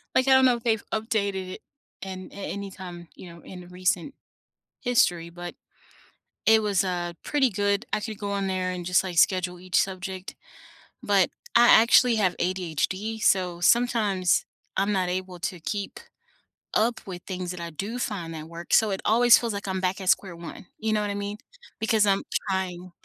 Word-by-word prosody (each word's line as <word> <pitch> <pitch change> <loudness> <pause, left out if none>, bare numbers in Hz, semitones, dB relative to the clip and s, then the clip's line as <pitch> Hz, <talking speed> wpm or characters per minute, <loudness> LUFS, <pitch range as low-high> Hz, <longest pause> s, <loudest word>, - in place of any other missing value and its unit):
Like, 260 +1 +3
I - - +5
don't 265 0 +7
know 250 -1 +5
if 235 - -9
they've 225 -3 +1
updated 200 -4 -1
it - - -14 0.4
an 190 -1 -7
a - - -13 0.2
any 200 -1 -5
time, 175 -3 -9
you 180 - -11
know, 170 - -14
in 180 -1 -10
recent 180 +6 -1 0.7
history, 175 -9 +2
but 175 0 -8 0.9
it 220 0 +6
was, 200 -3 +2
uh, 175 -2 -2
pretty 285 -3 +2
good. 200 0 0
I - - +1
could 215 -1 -6
go 205 -1 -3
on 200 -1 -1
there 185 -1 -1
and 180 -1 -5
just 180 +2 +2
like 180 -2 -5
schedule 180 -1 +2
each 185 0 +1
subject, 190 0 -4 0.7
but - - +3 0.2
I 240 0 +7
actually 235 +1 +6
have 185 -4 +1
ADHD, 185 +4 -2
so 180 -2 +2
sometimes 205 -4 +3 0.3
I'm 205 +1 +1
not 185 -2 0
able 185 0 -4
to 180 +1 -3
keep 200 +5 -4 0.8
up 235 +2 +2
with 180 -2 -7
things 185 -2 -5
that 180 0 -5
I 170 0 -6
do 200 +9 -5
find 195 -8 -3
that 155 0 -7
work. 170 +1 -7
So, 220 -3 +5
it 190 - -3
always 235 +2 +6
feels 230 -2 -2
like 200 0 -5
I'm 190 0 -1
back 185 +2 -1
at 190 -1 -2
square 185 -4 +2
1, 170 +1 -10
you 220 0 -1
know 210 - +1
what 205 - -2
I 200 - -3
mean? 205 +1 -4 0.4
Because 220 -1 +3
I'm 195 -1 +2 0.3
trying 185 -1 -3
190 Hz, 190 wpm, -26 LUFS, 180-215 Hz, 0.9 s, don't